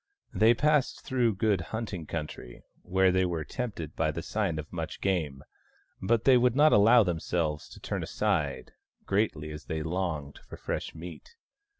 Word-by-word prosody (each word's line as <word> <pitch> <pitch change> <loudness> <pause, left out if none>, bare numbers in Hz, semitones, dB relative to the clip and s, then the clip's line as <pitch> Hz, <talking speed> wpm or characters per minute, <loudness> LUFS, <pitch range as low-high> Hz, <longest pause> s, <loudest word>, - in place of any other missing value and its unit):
They 115 +2 +5
passed 150 +1 +2
through 120 -5 +1
good 100 -1 +1
hunting 100 -4 -5
country, 75 -6 -6 0.2
where 95 0 +3
they 95 +1 +2
were 85 -3 -1
tempted 100 - -5
by 80 -1 +1
the 80 +2 -4
sign 100 -7 -1
of 75 +1 -7
much 80 -2 -5
game, 80 -9 -1 0.6
but 115 +3 +2
they 130 -2 +6
would 125 0 +3
not 150 +2 +6
allow 115 +3 +7
themselves 80 -3 -2
to - - -12
turn - - -3
aside, 70 -4 -1 0.3
greatly 95 -7 0
as 75 0 -8
they 80 -1 -3
longed 80 -4 -3
for - - -12
fresh - - -4
meat. 85 - -10
90 Hz, 165 wpm, -29 LUFS, 80-110 Hz, 0.6 s, allow